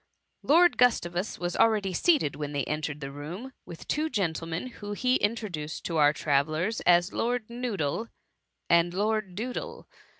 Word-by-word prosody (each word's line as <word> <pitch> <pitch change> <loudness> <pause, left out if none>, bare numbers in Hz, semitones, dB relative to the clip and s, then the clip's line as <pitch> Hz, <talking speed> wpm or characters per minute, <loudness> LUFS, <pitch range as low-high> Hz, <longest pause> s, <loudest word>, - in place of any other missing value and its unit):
Lord 345 +4 +4
Gustavus 195 -6 +2
was 175 0 -3
already 210 -4 +2
seated, 280 - +2
when 145 0 -5
they 140 -1 0
entered 150 0 -3
the 140 0 -5
room, 175 - -7
with 170 - -10
two 310 +1 0
gentlemen, 165 - -2 0.2
whom 205 0 -4
he 255 +3 +2
introduced 200 -9 -3
to 165 - -2
our 145 -1 +6
travellers 155 +8 0
as 175 +2 +4
Lord 240 -1 -1
Noodle 225 - -2 0.6
and 170 +1 +3
Lord 210 -2 -1
Doodle. 245 +5 -5
180 Hz, 145 wpm, -28 LUFS, 155-230 Hz, 0.6 s, our